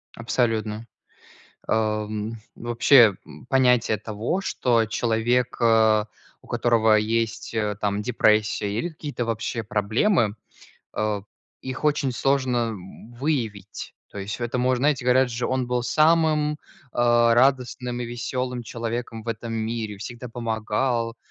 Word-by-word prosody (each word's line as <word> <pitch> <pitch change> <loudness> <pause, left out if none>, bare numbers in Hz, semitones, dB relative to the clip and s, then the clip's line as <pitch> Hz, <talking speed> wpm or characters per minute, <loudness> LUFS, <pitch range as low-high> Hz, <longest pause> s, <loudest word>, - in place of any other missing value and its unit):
Абсолютно. 115 -2 -1 0.8
Э, - - +1
м, 110 0 -1 0.2
вообще, 120 -2 +5
м, - - -13
понятие 125 -4 +3
того, 110 - -3
что 115 -10 +1
человек, 120 +3 0
э, 110 -2 +4 0.4
у - - -19
которого 115 -2 +3
есть, 115 +1 -1
э, 105 -2 -1
там, 105 0 0
депрессия, 105 -3 +2
или 115 +12 -2
какие-то, 145 -6 -5
вообще, 115 0 -3
проблемы, 110 - +1 0.6
э, 105 -1 -1 0.4
их 130 +2 -6
очень 145 -3 +1
сложно, 130 -1 +1
м, 105 +2 -10
выявить. 115 -8 -3 0.2
То 100 - -8
есть 100 +1 -4
в - - -12
этом 120 +1 -1
мож 130 0 +2
знаете, 140 0 +1
говорят 125 0 +4
же: 120 +1 -2
"Он 130 -1 0
был 125 -1 0
самым, 155 +1 +3
э, - - -9 0.4
радостным 120 +1 +2
и - - -3
весёлым 125 +1 -3
человеком 115 -1 -5
в - - -16
этом 115 0 -4
мире, 110 -2 -3
всегда 120 +4 -8
помогал", 115 +1 -1
115 Hz, 130 wpm, -24 LUFS, 110-125 Hz, 0.8 s, вообще